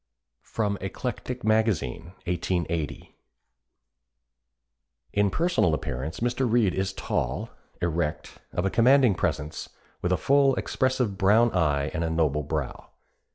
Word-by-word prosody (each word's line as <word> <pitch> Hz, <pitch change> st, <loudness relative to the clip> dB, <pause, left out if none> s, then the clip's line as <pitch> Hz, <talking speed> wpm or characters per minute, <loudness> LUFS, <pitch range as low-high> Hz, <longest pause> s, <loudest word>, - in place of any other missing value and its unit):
[Sidenote: 105 Hz, -3 st, -2 dB
Eclectic 125 Hz, +5 st, -4 dB
Magazine, 110 Hz, -, 0 dB
1880.] 85 Hz, -3 st, -2 dB, 2.0 s
"In 100 Hz, 0 st, +3 dB
personal 160 Hz, -, +2 dB
appearance 70 Hz, -, -5 dB
Mr. 120 Hz, 0 st, 0 dB
Reade 110 Hz, -6 st, +3 dB
is 95 Hz, 0 st, -1 dB
tall, 65 Hz, -9 st, -2 dB, 0.3 s
erect, 80 Hz, -3 st, -2 dB
of 90 Hz, -, -1 dB
a 95 Hz, -, +1 dB
commanding 125 Hz, 0 st, +5 dB
presence, 75 Hz, -3 st, -3 dB, 0.3 s
with 90 Hz, -, 0 dB
a 90 Hz, -, +3 dB
full, 140 Hz, +4 st, +3 dB
expressive 130 Hz, -6 st, 0 dB
brown 110 Hz, +4 st, +5 dB
eye 75 Hz, -5 st, +1 dB
and 85 Hz, -1 st, -1 dB
a 80 Hz, -, -1 dB
noble 80 Hz, -3 st, +1 dB
brow. 75 Hz, -2 st, -4 dB
95 Hz, 115 wpm, -26 LUFS, 80-115 Hz, 2.0 s, commanding